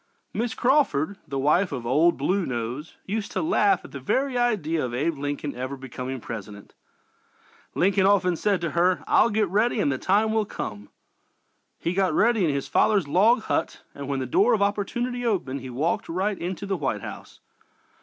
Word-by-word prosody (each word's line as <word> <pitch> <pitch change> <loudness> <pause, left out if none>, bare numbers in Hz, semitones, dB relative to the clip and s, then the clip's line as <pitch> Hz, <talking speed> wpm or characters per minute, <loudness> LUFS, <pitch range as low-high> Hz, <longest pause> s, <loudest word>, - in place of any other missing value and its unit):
Mrs. 230 +1 -2
Crawford, 240 - +2
the 140 -1 -4
wife 155 +8 +2
of 120 - -5
"Old 155 +8 +3
Blue 185 +8 0
Nose," 125 +3 -4
used 205 +1 -3
to - - 0
laugh 380 +3 +2
at - - -12
the - - -7
very 270 -1 0
idea 205 -11 +1
of 120 -1 -3
Abe 155 +6 0
Lincoln 145 0 -3
ever 130 +2 -4
becoming 130 0 -6
President. 105 -3 -8 1.0
Lincoln 195 +1 +3
often 185 -3 +3
said 200 +1 0
to 170 -2 -2
her: 180 +4 +2
"I'll - - +4
get 210 -1 +1
ready 215 +6 +1
and 145 - +2
the 130 - -2
time 215 +3 +2
will 220 -1 +1
come." 105 - -6 0.9
He 170 - -2
got 185 -4 +1
ready 225 -2 +3
in 165 - +2
his 140 -1 -2
father's 200 -8 +2
log 220 - +4
hut - - -2
and 140 -1 -7
when 140 -1 -1
the 130 - -2
door 210 - +3
of 205 - -3
opportunity 240 +5 -1
opened 180 - -1
he 130 - -7
walked 145 +8 -1
right 190 +4 -1
into 185 +3 -4
the 195 -1 -1
White 135 -9 -2
House. - - -9
180 Hz, 185 wpm, -25 LUFS, 140-210 Hz, 1.0 s, I'll